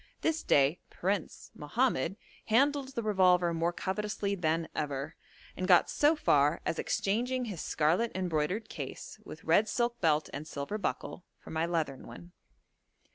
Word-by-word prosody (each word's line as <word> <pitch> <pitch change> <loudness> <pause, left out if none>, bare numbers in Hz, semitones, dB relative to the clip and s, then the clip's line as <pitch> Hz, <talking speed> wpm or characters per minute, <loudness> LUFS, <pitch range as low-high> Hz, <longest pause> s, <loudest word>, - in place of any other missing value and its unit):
This 320 0 0
day 140 +5 +3
'Prince' 190 -1 -3
Mohammed 215 - 0 0.3
handled 270 +3 +2
the 235 - -2
revolver 180 -4 +3
more 165 +1 0
covetously 200 +2 -2
than 165 -3 0
ever, 145 -1 -3 0.4
and 185 - -3
got 180 -2 +5
so 295 +2 +4
far 150 - +3
as 165 - -1
exchanging 245 +5 0
his 200 -8 -5
scarlet 170 +10 +1
embroidered 185 +4 -1
case, - - -7
with - - -10
red 215 +1 +3
silk 240 +1 -1
belt 155 -3 +2
and 145 +2 -6
silver 145 +10 -4
buckle, 190 - -4
for - - -13
my 160 +1 0
leathern 160 -6 -2
one. 175 - -11
185 Hz, 145 wpm, -31 LUFS, 160-220 Hz, 0.4 s, got